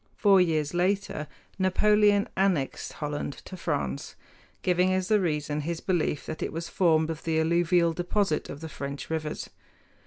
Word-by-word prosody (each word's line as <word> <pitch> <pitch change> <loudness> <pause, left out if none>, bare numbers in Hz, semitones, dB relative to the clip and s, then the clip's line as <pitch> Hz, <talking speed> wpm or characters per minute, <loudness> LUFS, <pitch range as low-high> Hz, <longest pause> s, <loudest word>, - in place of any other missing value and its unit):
Four 195 -3 +5
years 155 -4 +1
later 180 -3 0 0.3
Napoleon 205 +2 +4
annexed 185 -8 0
Holland 150 -2 -4
to 185 - -8
France, 70 - -3 0.5
giving 180 +1 +3
as 185 +1 0
the 215 -1 +4
reason 150 -3 -1
his 165 +2 -3
belief 175 -6 -1
that 155 - -6
it - - -2
was 165 +1 -5
formed 160 -3 +2
of 160 - -7
the 160 -1 +1
alluvial 170 +1 +3
deposit 175 0 0
of 160 +2 -7
French 140 +2 -6
rivers. 155 -1 -3
170 Hz, 150 wpm, -27 LUFS, 155-185 Hz, 0.5 s, Four